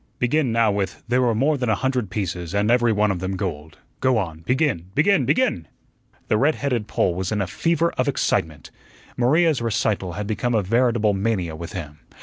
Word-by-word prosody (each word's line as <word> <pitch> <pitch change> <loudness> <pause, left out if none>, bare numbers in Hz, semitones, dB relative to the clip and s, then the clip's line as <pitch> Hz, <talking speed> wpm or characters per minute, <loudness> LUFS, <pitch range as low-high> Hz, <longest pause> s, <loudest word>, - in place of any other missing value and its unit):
"Begin 130 +1 +1
now 115 -2 +3
with 100 -1 -3
'There 125 +2 +2
were 120 -3 +2
more 140 +5 +1
than 125 -2 -1
a 110 - +3
hundred 125 -2 -1
pieces, 90 -2 -4
and 105 +2 +2
every 120 -1 +3
one 105 -1 +2
of 95 - -3
them 95 +1 -3
gold.' 80 -6 -5 0.2
Go 130 -2 +2
on, 85 -7 -3
begin, 125 - 0
begin, 195 +7 +3
begin!" 90 - +1 0.6
The 105 - +2
red 150 +3 +3
headed 125 -7 -2
Pole 90 - +1
was 90 +1 -3
in 105 - 0
a 100 - 0
fever 165 - 0
of - - +1
excitement. 75 -3 -1 0.4
Maria's 150 +3 +2
recital 105 -5 -1
had 105 +5 -4
become 115 +3 -1
a 105 - +2
veritable 115 0 +2
mania 95 -5 -1
with 85 +2 -8
him. 75 -5 -7
105 Hz, 195 wpm, -22 LUFS, 95-125 Hz, 0.6 s, now